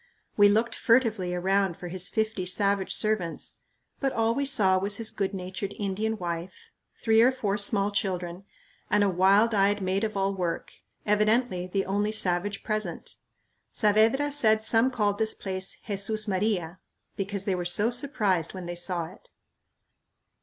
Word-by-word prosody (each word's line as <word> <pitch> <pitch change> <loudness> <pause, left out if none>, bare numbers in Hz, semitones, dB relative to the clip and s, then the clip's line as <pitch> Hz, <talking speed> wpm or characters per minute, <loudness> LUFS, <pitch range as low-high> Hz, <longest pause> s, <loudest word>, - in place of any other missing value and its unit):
We 205 -1 +6
looked 220 +3 +1
furtively 225 -7 +1
around 190 0 0
for 180 - -8
his 185 +1 -3
fifty 220 -3 -1
savage 195 +1 +1
servants, 215 -6 -1 0.4
but 270 -2 0
all 225 -1 +1
we 280 +2 0
saw 195 -9 +4
was 200 +2 -1
his 225 -1 -2
good 195 -2 -2
natured 190 +1 -5
Indian 210 +2 -2
wife, 175 - -6 0.3
three 225 -1 +4
or 250 +3 +5
four 210 -6 -2
small 205 0 +1
children, 180 -2 -3 0.5
and 210 0 +3
a 200 - +2
wild 195 +5 +3
eyed 205 0 +2
maid 190 +2 -1
of 215 -2 -2
all 195 0 0
work, 180 -3 -3 0.3
evidently 210 -2 +1
the 195 +1 -1
only 205 +2 0
savage 195 -1 -1
present. 215 -6 -3 0.6
Saavedra 225 +7 +2
said 220 -6 +2
some 225 +3 +3
called 210 -5 -1
this 220 0 +1
place 190 -1 -4
"Jesús 215 +1 0
Maria" 185 -3 -1 0.4
because 200 0 -4
they 195 - -1
were 180 -1 -2
so 205 +6 +2
surprised 210 - -1
when 185 -2 -7
they 175 0 -5
saw 175 -1 -2
it. 180 +5 -15
200 Hz, 160 wpm, -27 LUFS, 185-220 Hz, 0.6 s, We